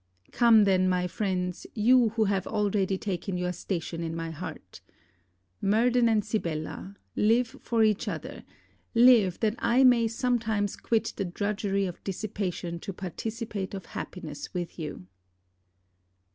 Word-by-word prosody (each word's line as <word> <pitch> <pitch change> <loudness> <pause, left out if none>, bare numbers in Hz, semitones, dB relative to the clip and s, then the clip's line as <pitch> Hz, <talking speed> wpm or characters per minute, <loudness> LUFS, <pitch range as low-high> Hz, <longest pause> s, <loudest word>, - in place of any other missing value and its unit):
Come 230 -3 +6
then, 185 -2 +3
my 180 -1 +1
friends, 180 -1 -2
you 240 +2 +5
who 220 - +4
have 195 -2 0
already 200 -3 0
taken 185 -1 -3
your 180 0 -1
station 170 -2 -4
in 165 -1 -3
my 165 0 -4
heart! 160 +3 -8 0.8
Murden 235 +4 +3
and 215 -2 +2
Sibella 185 -2 -4 0.2
live 230 +2 +2
for 230 -2 +1
each 215 -2 +2
other - - -5 0.5
live 230 -7 +6
that 215 -2 +2
I 235 +3 +3
may 240 -3 +5
sometimes 225 -4 0
quit 225 -2 -1
the 200 - -1
drudgery 200 +1 -1
of 180 -2 -7
dissipation 190 -4 -4
to 195 - -6
participate 200 +2 -5
of 190 - -7
happiness 155 -5 -7
with 175 0 -4
you! 150 - -6
200 Hz, 135 wpm, -28 LUFS, 180-225 Hz, 0.8 s, Come